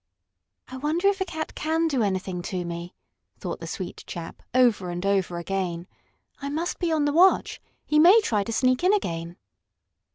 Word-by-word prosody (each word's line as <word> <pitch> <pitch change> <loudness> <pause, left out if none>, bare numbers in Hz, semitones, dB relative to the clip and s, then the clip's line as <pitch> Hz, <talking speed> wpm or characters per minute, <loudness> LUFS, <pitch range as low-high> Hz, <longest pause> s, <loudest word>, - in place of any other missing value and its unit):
"I 260 - -8
wonder 320 +8 +1
if 395 -1 -2
a - - +2
cat 315 -3 -5
can 320 +1 0
do 275 -6 0
anything 185 -3 -1
to 180 -2 -3
me," 170 +1 -6 0.4
thought - - -5
the - - -7
sweet - - -6
chap, - - -7
over 235 -8 +3
and 175 +2 -4
over 190 -3 +1
again. 175 -1 -3 0.6
"I 280 - -3
must 325 +4 -3
be 345 -2 0
on 310 -2 +2
the 290 - +1
watch. 365 +4 +4 0.2
He 300 - +3
may 365 +8 +8
try 210 - 0
to 230 - -4
sneak 255 +5 +2
in 380 +3 +5
again." 170 - -4
255 Hz, 185 wpm, -25 LUFS, -, 0.6 s, may